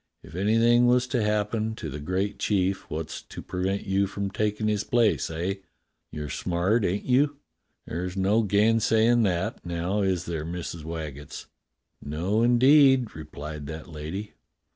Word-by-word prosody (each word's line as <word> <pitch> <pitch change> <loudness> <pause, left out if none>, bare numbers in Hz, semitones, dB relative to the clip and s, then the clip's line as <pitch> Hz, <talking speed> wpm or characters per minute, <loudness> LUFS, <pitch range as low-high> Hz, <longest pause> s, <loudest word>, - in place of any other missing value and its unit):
If 75 - -13
anything 115 +6 +4
was 125 0 +4
to 125 - 0
happen 105 +1 0
to - - -6
the 75 - -6
great 95 +6 -2
chief 95 -1 0
wot's 80 0 -5
to - - -11
prevent 95 +2 -2
you 100 +1 +1
from 100 0 -4
takin' 105 +1 -1
his 105 -1 0
place, 120 -3 +2
eh.'* 85 +5 -2 0.5
You're 75 -1 -5
smart, 90 - 0
ain't 95 +3 -1
you.? 140 +3 +2 0.5
There's 90 +3 -4
no 100 +4 +3
gainsay 110 +2 +3
in' 120 0 +4
that, 90 -5 -1
now, 85 +4 -1
is 95 -2 0
there. 80 -3 -3
Missus 85 0 -5
Waggetts.?" 75 -3 -7 0.6
"No, 85 +9 -1
indeed," 130 +1 +5
replied 75 -1 -7
that 80 +2 -7
lady. 80 +7 -6
100 Hz, 150 wpm, -26 LUFS, 85-110 Hz, 0.6 s, indeed